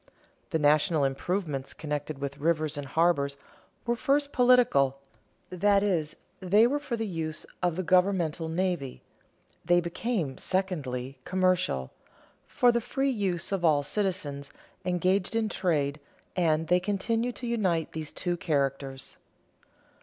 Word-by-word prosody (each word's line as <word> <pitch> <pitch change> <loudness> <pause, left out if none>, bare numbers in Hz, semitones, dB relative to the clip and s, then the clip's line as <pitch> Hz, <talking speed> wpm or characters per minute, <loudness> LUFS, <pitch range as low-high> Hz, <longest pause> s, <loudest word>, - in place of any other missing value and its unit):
The - - +1
national 150 0 +3
improvements 140 0 -2
connected 150 -1 -4
with 140 +1 -5
rivers 155 0 0
and 145 -1 -5
harbors 140 -3 +1 0.5
were 235 0 +1
first 280 +4 +1
political 245 - +4 0.5
that 200 +2 +3
is, 165 -7 0 0.2
they 200 +4 +4
were 280 +4 +1
for 280 -5 -3
the 225 - -2
use 160 -5 -4 0.2
of 175 -3 +1
the 185 - -2
governmental 180 -3 +2
navy; 170 -6 -2 0.6
they 175 +1 +4
became, 170 - -2
secondly, 140 -9 -2
commercial 185 - +1 0.6
for 245 - +4
the 235 0 0
free 270 +4 0
use 195 -8 -1
of 195 -3 -1
all 150 -3 +4
citizens 150 -7 -3 0.3
engaged 185 +3 +1
in 225 -1 +1
trade; 155 -7 0 0.4
and 160 -3 +1
they 180 +2 +4
continue 225 +5 -1
to 245 - -8
unite 190 -9 0
these 155 -2 -5
two 175 -1 -2
characters. 135 -4 -2
175 Hz, 130 wpm, -28 LUFS, 150-195 Hz, 0.6 s, political